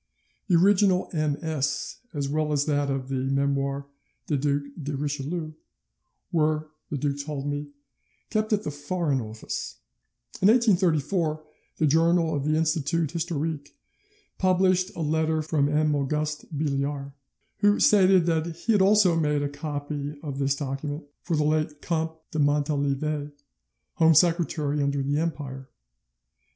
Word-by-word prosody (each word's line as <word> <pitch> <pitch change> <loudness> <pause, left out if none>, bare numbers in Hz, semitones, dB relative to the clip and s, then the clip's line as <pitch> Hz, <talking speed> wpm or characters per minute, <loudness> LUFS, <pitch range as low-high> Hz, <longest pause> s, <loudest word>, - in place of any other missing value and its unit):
The 180 - +3
original 190 +1 +4
MS., 150 -1 -1
as 145 -4 -2
well 150 +1 0
as 145 -1 +1
that 145 -2 0
of 135 -1 -2
the 130 -1 -1
Memoires 140 0 0 0.4
du 150 - 0
Duc 140 +1 0 0.2
de 145 -1 -3
Richelieu, 150 +3 -3 0.8
were, 155 -1 +1 0.2
the 145 - -2
duke 140 0 -2
told 145 -2 -5
me, 145 0 -3 0.6
kept 215 0 0
at 210 -1 +2
the 150 - -3
Foreign 145 -1 -1
Office. 110 0 -6 0.6
In 190 - +5
1834 175 - +2 0.3
the 155 - +2
journal 165 +2 +3
of 145 -2 -2
the 155 +1 +2
Institut 160 0 0
historique 160 -3 -3 0.6
published 185 0 +3
a - - -4
letter 160 0 +1
from 150 -2 +1
M. 150 0 +2
Auguste 150 +2 -1
Billiard, 140 -1 -2 0.5
who 205 0 +3
stated 190 -4 +5
that 165 -1 +1
he 200 +7 -1
had 205 -3 +4
also 195 -3 +5
made 150 -3 +1
a 145 - -1
copy 145 0 -5
of 140 -3 -5
this 140 0 +1
document 145 +2 -4 0.2
for 170 - -1
the 150 - +2
late 155 0 0
Comte 160 -1 -2
de 155 - -2
Montalivet, 145 0 0 0.7
Home 160 -1 +5
Secretary 160 -3 +2
under 140 -1 0
the 145 +2 0
Empire. 140 -5 -4
150 Hz, 140 wpm, -26 LUFS, 145-165 Hz, 0.8 s, In